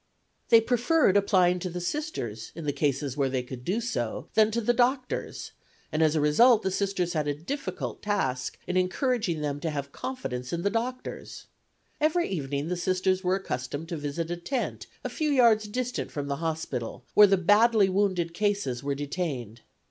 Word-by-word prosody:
They 230 Hz, -1 st, +8 dB
preferred 245 Hz, -, +3 dB
applying 185 Hz, -3 st, +3 dB
to 180 Hz, -, -3 dB
the 180 Hz, +1 st, -5 dB
Sisters 175 Hz, -, -4 dB
in 165 Hz, -2 st, -6 dB
cases 140 Hz, -2 st, -1 dB
where 140 Hz, -2 st, +1 dB
they 130 Hz, -1 st, -1 dB
could 125 Hz, -1 st, -8 dB
do 190 Hz, -, 0 dB
so 235 Hz, 0 st, -3 dB
than 220 Hz, -1 st, +5 dB
to 225 Hz, +2 st, -1 dB
the 235 Hz, +1 st, +2 dB
doctors, 255 Hz, +1 st, -1 dB, 0.4 s
and 155 Hz, +1 st, 0 dB
as 155 Hz, 0 st, +3 dB
a -, -, +3 dB
result 215 Hz, +11 st, +5 dB
the 190 Hz, -, 0 dB
Sisters 190 Hz, -2 st, -1 dB
had 155 Hz, -3 st, -1 dB
a 145 Hz, -, 0 dB
difficult 275 Hz, -, -5 dB
task 135 Hz, -12 st, -1 dB
in 180 Hz, -, -1 dB
encouraging 185 Hz, -, 0 dB
them 145 Hz, -1 st, -2 dB
to 160 Hz, -, -2 dB
have 140 Hz, -2 st, -4 dB
confidence 125 Hz, -, -5 dB
in 170 Hz, 0 st, -2 dB
the 200 Hz, -, +1 dB
doctors. 250 Hz, +3 st, -4 dB, 0.5 s
Every 320 Hz, +3 st, +2 dB
evening 145 Hz, -4 st, -3 dB
the 180 Hz, +1 st, -2 dB
Sisters 185 Hz, +1 st, +1 dB
were 185 Hz, +1 st, +2 dB
accustomed 145 Hz, -3 st, -4 dB
to 170 Hz, -, -3 dB
visit 150 Hz, +3 st, -3 dB
a 175 Hz, -, -2 dB
tent 245 Hz, +9 st, -3 dB, 0.2 s
a -, -, -1 dB
few 310 Hz, -2 st, -1 dB
yards 230 Hz, -6 st, +4 dB
distant 250 Hz, +3 st, -3 dB
from 145 Hz, -1 st, -4 dB
the 140 Hz, 0 st, -2 dB
hospital, 155 Hz, -7 st, -4 dB
where 210 Hz, 0 st, +8 dB
the 195 Hz, 0 st, +4 dB
badly 210 Hz, +3 st, +5 dB
wounded 185 Hz, -3 st, 0 dB
cases 200 Hz, -11 st, -1 dB
were 140 Hz, 0 st, -2 dB
detained. 140 Hz, -, -4 dB
180 Hz, 180 wpm, -27 LUFS, 145-220 Hz, 0.5 s, They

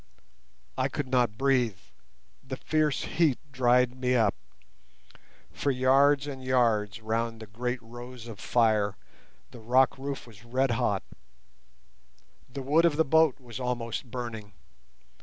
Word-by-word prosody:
I 130 Hz, -, +2 dB
could 145 Hz, -1 st, -4 dB
not 125 Hz, -4 st, +1 dB
breathe; 125 Hz, -7 st, +2 dB, 0.7 s
the 130 Hz, 0 st, -6 dB
fierce 155 Hz, -1 st, 0 dB
heat 155 Hz, -6 st, +1 dB
dried 125 Hz, -1 st, +3 dB
me 125 Hz, 0 st, 0 dB
up. 110 Hz, -5 st, +3 dB, 1.2 s
For 145 Hz, -, -2 dB
yards 135 Hz, +2 st, +4 dB
and 135 Hz, -3 st, -7 dB
yards 115 Hz, -5 st, +1 dB
round 115 Hz, +1 st, -2 dB
the 110 Hz, -, -8 dB
great 125 Hz, +4 st, -3 dB
rose 120 Hz, +1 st, -10 dB
of 110 Hz, -4 st, -9 dB
fire 110 Hz, -4 st, +2 dB, 0.5 s
the 120 Hz, -, -11 dB
rock 130 Hz, +4 st, +3 dB
roof 140 Hz, 0 st, -5 dB
was 110 Hz, -3 st, -16 dB
red 130 Hz, +2 st, 0 dB
hot. 105 Hz, -4 st, 0 dB, 1.5 s
The 135 Hz, +2 st, -6 dB
wood 155 Hz, +5 st, +3 dB
of 165 Hz, -3 st, +3 dB
the 160 Hz, -, +3 dB
boat 160 Hz, -1 st, +3 dB
was 120 Hz, -2 st, -9 dB
almost 125 Hz, -1 st, -3 dB
burning. 115 Hz, -4 st, -6 dB
125 Hz, 135 wpm, -28 LUFS, 115-135 Hz, 1.5 s, yards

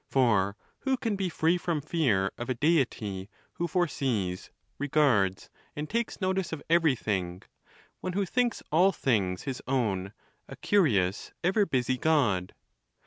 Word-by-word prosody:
For 105 Hz, -7 st, +2 dB, 0.2 s
who 265 Hz, -1 st, 0 dB
can 225 Hz, -4 st, -1 dB
be 195 Hz, -2 st, -1 dB
free 165 Hz, +2 st, +1 dB
from 170 Hz, -3 st, -1 dB
fear 130 Hz, -, +1 dB
of 120 Hz, -, -6 dB
a 130 Hz, -, 0 dB
Deity 115 Hz, -, 0 dB, 0.2 s
who 170 Hz, -, -2 dB
foresees, 130 Hz, -, -1 dB, 0.3 s
regards, 130 Hz, -10 st, +2 dB, 0.2 s
and 150 Hz, +1 st, -4 dB
takes 230 Hz, +4 st, -2 dB
notice 190 Hz, -1 st, -1 dB
of 160 Hz, -, -5 dB
everything; 105 Hz, -, +1 dB, 0.6 s
one 185 Hz, -, -4 dB
who 200 Hz, +1 st, 0 dB
thinks 240 Hz, +3 st, 0 dB
all 180 Hz, +5 st, +5 dB
things 100 Hz, -, 0 dB
his 130 Hz, -2 st, -4 dB
own; 105 Hz, -7 st, -1 dB, 0.3 s
a -, -, -9 dB
curious, 105 Hz, -, +1 dB
ever 195 Hz, +3 st, +2 dB
busy 130 Hz, -2 st, 0 dB
God 120 Hz, -, +1 dB
140 Hz, 140 wpm, -28 LUFS, -, 0.6 s, all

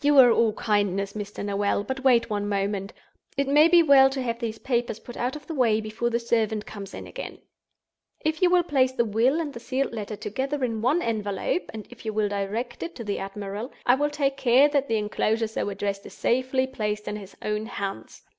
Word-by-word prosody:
"You 290 Hz, 0 st, +4 dB
are 250 Hz, -3 st, +9 dB
all 230 Hz, -1 st, +3 dB
kindness, 200 Hz, -2 st, 0 dB
Mr. 205 Hz, -1 st, -5 dB
Noel; 200 Hz, 0 st, 0 dB
but 265 Hz, +3 st, -4 dB
wait 245 Hz, -3 st, +4 dB
one 205 Hz, -2 st, -2 dB
moment. 200 Hz, 0 st, -1 dB, 0.5 s
It 280 Hz, 0 st, +1 dB
may 295 Hz, +3 st, +6 dB
be 340 Hz, 0 st, +6 dB
well 275 Hz, -3 st, +7 dB
to 270 Hz, 0 st, -3 dB
have 235 Hz, -1 st, -2 dB
these 225 Hz, -2 st, -3 dB
papers 235 Hz, -3 st, -1 dB
put 240 Hz, -, -11 dB
out 250 Hz, +3 st, -2 dB
of 295 Hz, -1 st, -9 dB
the 330 Hz, -, -5 dB
way 235 Hz, -6 st, +3 dB
before 220 Hz, +2 st, -2 dB
the 235 Hz, 0 st, 0 dB
servant 220 Hz, -2 st, 0 dB
comes 200 Hz, -2 st, -8 dB
in -, -, -7 dB
again. -, -, -7 dB, 0.8 s
If 315 Hz, +2 st, -2 dB
you 365 Hz, -, +5 dB
will 355 Hz, 0 st, +4 dB
place 265 Hz, -5 st, +2 dB
the 235 Hz, -2 st, +1 dB
Will 235 Hz, +8 st, +2 dB
and 300 Hz, -4 st, -3 dB
the 235 Hz, -, -7 dB
Sealed 260 Hz, +2 st, -2 dB
Letter 215 Hz, -1 st, -4 dB
together 265 Hz, +7 st, -3 dB
in 225 Hz, -3 st, -1 dB
one 290 Hz, +9 st, +2 dB
envelope—and 215 Hz, -, -2 dB
if 245 Hz, -, -13 dB
you 220 Hz, -1 st, -3 dB
will 210 Hz, -1 st, +1 dB
direct 205 Hz, +5 st, -3 dB
it 340 Hz, 0 st, -5 dB
to 235 Hz, -, -6 dB
the 205 Hz, -2 st, -2 dB
admiral—I 205 Hz, +5 st, -2 dB
will 290 Hz, +3 st, +1 dB
take 280 Hz, -2 st, -1 dB
care 265 Hz, +2 st, +5 dB
that 280 Hz, -1 st, +1 dB
the 225 Hz, -, +1 dB
inclosure 215 Hz, +1 st, 0 dB
so 220 Hz, -1 st, -3 dB
addressed 200 Hz, 0 st, -3 dB
is -, -, -13 dB
safely 260 Hz, +2 st, +1 dB
placed 210 Hz, -5 st, -3 dB
in 210 Hz, -, -3 dB
his 195 Hz, -2 st, -11 dB
own 210 Hz, +1 st, -2 dB
hands. 195 Hz, -, -6 dB
230 Hz, 215 wpm, -26 LUFS, 210-265 Hz, 0.8 s, are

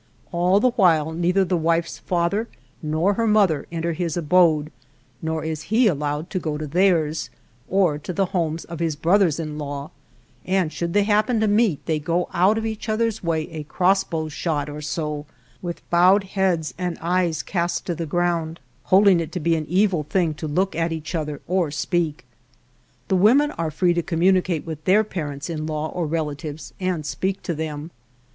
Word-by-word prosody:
All 180 Hz, +3 st, +3 dB
the 250 Hz, +3 st, +3 dB
while 165 Hz, -, +3 dB
neither 180 Hz, +4 st, +1 dB
the 180 Hz, -, 0 dB
wife's 165 Hz, 0 st, 0 dB
father 185 Hz, +6 st, 0 dB, 0.3 s
nor 155 Hz, +6 st, +1 dB
her 230 Hz, +2 st, 0 dB
mother 200 Hz, -8 st, +3 dB
enter 170 Hz, 0 st, -2 dB
his 170 Hz, 0 st, -2 dB
abode, 155 Hz, -2 st, +3 dB, 0.5 s
nor 160 Hz, -1 st, -2 dB
is 155 Hz, -1 st, -4 dB
he 230 Hz, +4 st, +4 dB
allowed 150 Hz, -2 st, -1 dB
to 185 Hz, -, -1 dB
go 155 Hz, -3 st, -3 dB
to 155 Hz, -, -4 dB
theirs, 160 Hz, -4 st, +1 dB, 0.4 s
or 180 Hz, -6 st, +2 dB
to 165 Hz, -, -6 dB
the 195 Hz, +2 st, +1 dB
homes 165 Hz, -3 st, -1 dB
of 170 Hz, -2 st, -8 dB
his 165 Hz, -3 st, 0 dB
brothers 170 Hz, +1 st, +2 dB
in 155 Hz, -2 st, -4 dB
law, 145 Hz, +1 st, -5 dB, 0.5 s
and 185 Hz, -4 st, 0 dB
should 170 Hz, -1 st, -3 dB
they 205 Hz, -, +4 dB
happen 215 Hz, +3 st, +2 dB
to 220 Hz, -, +2 dB
meet 205 Hz, -6 st, +2 dB
they 160 Hz, -2 st, 0 dB
go 170 Hz, +3 st, -1 dB
out 195 Hz, +5 st, +3 dB
of 225 Hz, -, -2 dB
each 220 Hz, 0 st, -4 dB
other's 220 Hz, -1 st, 0 dB
way 160 Hz, -2 st, -1 dB
a 160 Hz, -1 st, -5 dB
crossbow's 175 Hz, -3 st, 0 dB
shot 150 Hz, -3 st, -2 dB
or 150 Hz, +1 st, -7 dB
so, 150 Hz, -1 st, -3 dB, 0.3 s
with 175 Hz, -1 st, -6 dB
bowed 185 Hz, +4 st, +5 dB
heads 185 Hz, -5 st, 0 dB
and 180 Hz, -2 st, -2 dB
eyes 170 Hz, -2 st, 0 dB
cast 175 Hz, -2 st, -2 dB
to 175 Hz, -, -1 dB
the 165 Hz, 0 st, -4 dB
ground, 170 Hz, 0 st, -1 dB, 0.3 s
holding 190 Hz, +4 st, +5 dB
it 165 Hz, -1 st, -4 dB
to 180 Hz, -, -2 dB
be 165 Hz, +1 st, +2 dB
an 155 Hz, -2 st, -3 dB
evil 185 Hz, -2 st, +2 dB
thing 165 Hz, +1 st, 0 dB
to 155 Hz, +1 st, -6 dB
look 185 Hz, +6 st, 0 dB
at 165 Hz, +1 st, 0 dB
each 160 Hz, +1 st, -5 dB
other 150 Hz, -3 st, -3 dB
or 180 Hz, -3 st, +1 dB
speak. 155 Hz, -1 st, -1 dB, 0.8 s
The 190 Hz, -, +1 dB
women 255 Hz, +11 st, +5 dB
are 165 Hz, -, -3 dB
free 175 Hz, +3 st, +2 dB
to 170 Hz, -, 0 dB
communicate 180 Hz, -1 st, +1 dB
with 155 Hz, -2 st, -6 dB
their 205 Hz, +4 st, +5 dB
parents 150 Hz, -8 st, -5 dB
in 155 Hz, -2 st, -4 dB
law 155 Hz, 0 st, -2 dB
or 175 Hz, -3 st, -2 dB
relatives 155 Hz, -1 st, -4 dB
and 180 Hz, -5 st, -2 dB
speak 190 Hz, +6 st, -2 dB
to 175 Hz, -, -2 dB
them. 155 Hz, 0 st, -5 dB
170 Hz, 185 wpm, -23 LUFS, 155-185 Hz, 0.8 s, bowed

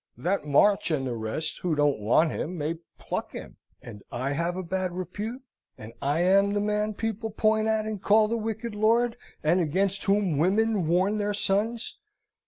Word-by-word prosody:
that 180 Hz, -3 st, -1 dB
March 195 Hz, +9 st, +4 dB
and 145 Hz, -5 st, 0 dB
the 125 Hz, -, -2 dB
rest, 115 Hz, +8 st, -3 dB
who 175 Hz, -3 st, -1 dB
don't 145 Hz, -4 st, +2 dB
want 120 Hz, +10 st, +3 dB
him, 180 Hz, +3 st, -4 dB
may 155 Hz, +1 st, -1 dB, 0.2 s
pluck -, -, -4 dB
him! -, -, -9 dB, 0.3 s
And 105 Hz, -3 st, -10 dB
I 130 Hz, +3 st, -2 dB
have 170 Hz, +4 st, -1 dB
a 185 Hz, -, -3 dB
bad 185 Hz, 0 st, -2 dB
repute; 205 Hz, +8 st, -5 dB, 0.3 s
and 110 Hz, +1 st, -10 dB
I 145 Hz, +4 st, +1 dB
am 195 Hz, +3 st, +4 dB
the -, -, +2 dB
man 210 Hz, +1 st, -1 dB
people 225 Hz, +1 st, -3 dB
point 215 Hz, 0 st, +1 dB
at, 220 Hz, -1 st, +1 dB
and 215 Hz, -3 st, -4 dB
call 215 Hz, +2 st, +4 dB
the 230 Hz, -, -1 dB
wicked 225 Hz, 0 st, -4 dB
lord, 230 Hz, +3 st, +2 dB, 0.3 s
and 165 Hz, +4 st, +3 dB
against 190 Hz, +5 st, 0 dB
whom 195 Hz, -7 st, +2 dB
women 200 Hz, +1 st, +2 dB
warn 190 Hz, +5 st, +2 dB
their 205 Hz, 0 st, -1 dB
sons! 215 Hz, +4 st, -1 dB
195 Hz, 185 wpm, -27 LUFS, 160-215 Hz, 0.3 s, March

